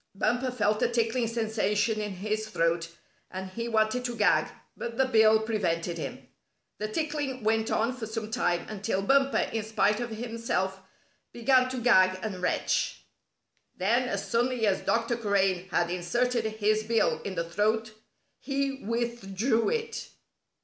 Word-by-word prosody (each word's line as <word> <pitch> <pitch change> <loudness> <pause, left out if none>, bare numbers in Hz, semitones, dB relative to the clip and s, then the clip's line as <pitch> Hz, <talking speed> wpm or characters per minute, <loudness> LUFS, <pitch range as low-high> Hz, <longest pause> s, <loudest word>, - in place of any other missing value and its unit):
Bumper 240 +6 +1
felt 210 -4 0
a - - +4
tickling 235 0 0
sensation 220 -1 0
in 210 -1 -3
his 215 +3 -3
throat, 165 -3 0 0.4
and 190 0 -6
he 230 +4 -4
wanted 220 +2 +1
to 240 -1 -3
gag, 210 - +3 0.3
but 235 -1 -6
the 265 - +4
bill 220 -3 +5
prevented 175 -6 -1
him. 140 - -6 0.5
The 215 - -2
tickling 285 0 -3
went 220 +1 +1
on 230 +3 +1
for 230 -4 -6
some 220 -1 -5
time 175 -5 0
until 195 -2 -2
Bumper, 275 +4 +3
in 225 - 0
spite 210 -1 +1
of 240 -1 -3
himself, 225 -4 -2 0.5
began 255 +1 +3
to 255 - -4
gag 185 -6 +4
and 195 -4 -4
retch. 180 - 0 0.7
Then, 235 +7 +1
as - - -3
suddenly 240 0 +1
as 195 -2 +1
Dr. 230 +1 +1
Crane 195 -4 +1
had 175 -1 +1
inserted 235 +7 0
his 215 0 +1
bill 225 +1 +1
in 195 - -5
the 170 -1 -2
throat, 215 +5 0 0.5
he 275 -1 -2
withdrew 230 0 0
it. 460 0 -3
220 Hz, 150 wpm, -28 LUFS, 200-240 Hz, 0.7 s, bill